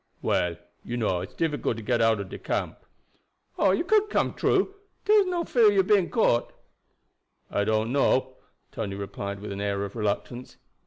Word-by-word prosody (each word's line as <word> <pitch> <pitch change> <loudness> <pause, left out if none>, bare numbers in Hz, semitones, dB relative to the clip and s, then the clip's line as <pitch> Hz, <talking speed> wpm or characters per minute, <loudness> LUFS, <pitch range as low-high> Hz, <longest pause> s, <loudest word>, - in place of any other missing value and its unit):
"Well, 85 -1 +1 0.3
you 120 - -4
know, 95 -6 0
it's 95 - -9
difficult 150 -8 -1
to 115 - -7
get 120 +1 +1
out 115 -1 +3
ob 100 -2 -7
camp." - - -2 0.8
"Oh, 195 - +4
you 195 - +2
could 425 +3 +2
get - - 0
through. 390 0 +2 0.3
Dere 425 0 +6
is 400 - +3
no 350 -2 -1
fear 240 -7 +3
about 205 - +6
you 195 -1 +4
being 190 -2 +3
caught." 120 - +1 1.0
"I 100 - 0
don't 110 +2 0
know," 130 -1 +1 0.3
Tony 100 -3 -4
replied 100 0 -5
with 105 - -6
an 100 0 -5
air 100 -1 -1
of 100 - -9
reluctance. 115 +3 -3
120 Hz, 180 wpm, -26 LUFS, -, 1.0 s, Dere